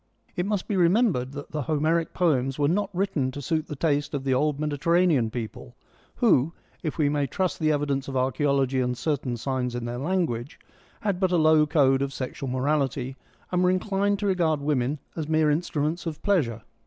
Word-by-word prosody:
It 180 +2 -1
must 205 -3 -1
be 205 - -1
remembered 175 - +2
that 145 0 -8
the 155 - -2
Homeric 160 +3 0
poems 135 -7 +1
were 145 -1 +2
not 195 +5 +1
written 180 -8 0
to 145 - -6
suit 155 +3 -1
the 150 - -5
taste 145 0 0
of 135 - -3
the 135 -1 +1
old 145 +2 +1
Mediter 150 +1 -2
ranean 170 -10 +3
people, 110 - -7 0.4
who, 165 - +3 0.3
if 155 - -3
we 150 -3 +2
may 145 -1 0
trust 185 +7 -1
the 155 -1 +2
evidence 145 -2 -1
of 135 -1 -3
archaeology 135 0 +1
and 125 -1 -1
certain 135 -5 -2
signs 125 0 -2
in 120 -1 -3
their 120 +1 -4
language, 145 -5 -2 0.4
had 200 -4 -1
but 185 -2 +1
a 175 - +3
low 155 -1 +5
code 135 -4 +3
of 140 0 -2
sexual 130 +1 -5
morality, 135 -1 -1 0.4
and 180 0 +2
were 180 - +4
inclined 200 +2 +1
to 205 - -3
regard 170 -6 +2
women 140 -1 0 0.2
as 160 -2 -4
mere 155 -1 +3
instruments 155 +1 -1
of 155 -2 -4
pleasure. 125 - +1
150 Hz, 195 wpm, -26 LUFS, 135-170 Hz, 0.4 s, low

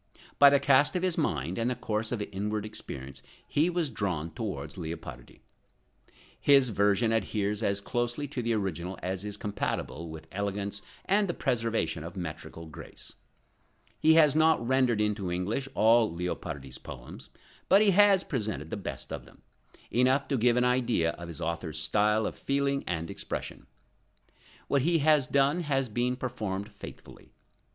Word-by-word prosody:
By 140 - +10
the 140 0 +4
cast 140 +4 +4
of 180 - 0
his 185 -2 +1
mind 85 - -1
and 115 +2 +1
the 125 - -1
course 110 -2 -2
of 120 -4 -2
his - - -4
inward 105 +2 -2
experience 65 -10 -7 0.3
he 155 +4 +2
was 170 -5 -1
drawn 90 -7 -2
towards 80 - -5
Leopardi. 80 -8 -8 1.0
His 135 -3 +5
version 105 +2 +2
adheres 105 -1 0
as 100 -2 0
closely 120 +5 -2
to 135 -3 -3
the 115 0 0
original 95 -3 -2
as 95 +1 -3
is 105 0 -4
compatible 85 -5 -3
with 80 0 -9
elegance 100 +1 -3 0.2
and 200 +1 +3
the 175 - -2
preservation 115 - -1
of 85 +3 -8
metrical 80 -1 -6
grace. 80 - -9 0.9
He 160 0 +5
has 155 -3 +6
not 155 -6 +3
rendered 130 -4 +3
into 105 -3 -1
English 105 +10 -2
all 115 +1 +5
Leopardi's 80 -6 -5
poems, - - -10 0.4
but 200 +2 +7
he 205 - +5
has 200 0 +6
presented 105 - -3
the - - -2
best 100 - -6
of - - -6
them, - - -20 0.5
enough 130 +3 +3
to 140 - +1
give 120 +1 +3
an 125 - +3
idea 125 -9 +2
of 85 0 -9
his 85 -4 -8
author's 80 -1 -3
style 105 +6 +2
of - - -2
feeling 140 0 0
and 85 -2 -2
expression. - - -6 1.0
What 140 - +2
he 165 +4 +3
has 150 -3 +4
done, 140 +4 +3
has 135 -6 0
been 120 +3 0
performed 105 -6 -4
faithfully. 100 - -12
110 Hz, 160 wpm, -29 LUFS, 90-135 Hz, 1.0 s, By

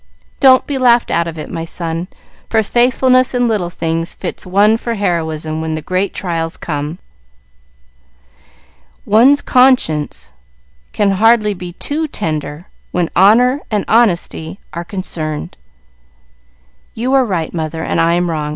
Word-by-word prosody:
Don't 260 -1 +6
be 280 -2 -3
laughed 240 -2 +3
out 170 +1 +1
of 165 -1 -7
it, 155 - -6
my 165 - -4
son, 165 +1 -4 0.4
for 220 -1 +2
faithfulness 255 +3 +2
in 245 -1 +2
little 205 -6 -1
things 165 -1 -3
fits - - -6
one 205 +4 +4
for 230 +1 -3
heroism 160 -5 -1
when 160 0 -3
the 155 - -5
great 185 +2 -1
trials 165 -3 -3
come. 150 +1 -4 2.1
One's 255 +7 +4
conscience 160 - +2 0.6
can 205 -1 +1
hardly 215 +1 +3
be 180 -2 -8
too 310 - -3
tender 155 - -4 0.3
when 175 -2 -1
honor 245 +9 +4
and 210 -4 -1
honesty 190 -6 +1
are 170 +1 -4
concerned." 165 -5 -5 1.4
"You 250 +4 -1
are 270 -1 +5
right, 180 -9 -3
mother, 160 -1 -4
and 165 - 0
I 165 +1 +3
am 175 -1 0
wrong. 150 -2 -3
180 Hz, 140 wpm, -16 LUFS, 165-235 Hz, 2.1 s, Don't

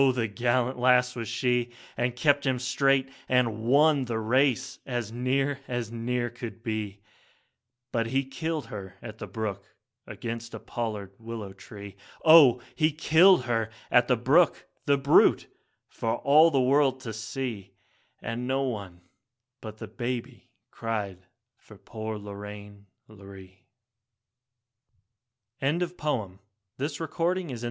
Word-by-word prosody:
the 125 -3 -1
gallant 125 +3 0
lass 125 0 +4
was 115 -2 -4
she, 120 +1 0 0.3
And 120 +1 -1
kept 140 +3 +3
him 130 -2 +1
straight 135 +1 +1 0.2
and 120 -4 +2
won 140 +4 +4
the 115 -2 -2
race 125 +3 +1
as 120 -4 -3
near 135 +3 0
as 120 -3 -3
near 120 +1 -2
could 120 -1 -8
be; 105 -4 -4 0.9
But 115 -1 0
he 135 +3 +1
killed 155 +1 -3
her 100 -4 -8
at 110 -2 -9
the - - -6
brook 105 -3 -4 0.4
against 115 0 -6
a - - -6
pollard 105 -5 -5
willow 110 -4 -7
tree, 100 0 -11 0.3
Oh! 145 -7 +8
he 155 -1 +2
killed 160 +2 +5
her 115 -3 -1 0.2
at - - +5
the - - +3
brook, - - +3 0.2
the 140 0 +3
brute, 140 +1 +4 0.4
for 115 0 -2
all 150 +6 +5
the 140 -4 +1
world 130 +1 +3
to 115 -4 -6
see, 110 -1 -5 0.5
And 120 +2 -4
no 135 +1 +1
one 100 -9 -5 0.6
but 110 -1 -8
the - - -7
baby 120 -1 -5 0.2
cried 105 -5 -3 0.4
for - - -16
poor 110 -1 -6
Lorraine, 100 0 -9 0.2
Lorree. 95 -2 -14 2.0
Last 170 +6 0
poem 110 - -2 0.4
written 165 +5 -1
in 175 - -8
illness. 125 -5 -6
120 Hz, 135 wpm, -27 LUFS, 110-135 Hz, 2.0 s, Oh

